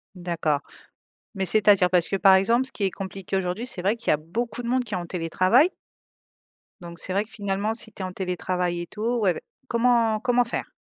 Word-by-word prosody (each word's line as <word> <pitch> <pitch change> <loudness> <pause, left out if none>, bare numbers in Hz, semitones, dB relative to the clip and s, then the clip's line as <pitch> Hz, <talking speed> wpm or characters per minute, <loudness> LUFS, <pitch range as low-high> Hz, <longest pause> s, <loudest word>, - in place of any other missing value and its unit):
D'accord, 170 -5 -1 0.8
mais, 195 -1 -1
c'est-à-dire? 200 -3 +4
Parce 180 -2 +2
que, 195 - 0
par 195 0 +6
exemple, 235 +7 +2
ce - - -6
qui 205 - -3
est 190 - +2
compliqué, 195 0 -5
aujourd'hui, 190 +5 -2
c'est 195 -7 -6
vrai 205 +5 +1
qu'il 230 - -9
y - - +6
a - - +4
beaucoup 225 +10 -4
de 235 - -5
monde 255 +1 +1
qui - - -5
est - - 0
en 175 - -4
télétravail 185 - +3 1.1
donc 170 -1 -9
c'est 185 - -4
vrai 200 +2 +2
que 220 - -17
finalement, 200 +1 -2
si 225 -1 -6
tu - - -10
es - - -2
en 185 - -6
télétravail 180 -1 -2
et 175 - -6
tout, 225 +5 -2
ouais, 190 -4 +3
ouais, - - -8 0.3
comment 235 -3 +2
comment 245 +1 +2
faire? 235 - -4
195 Hz, 225 wpm, -25 LUFS, 180-230 Hz, 1.1 s, par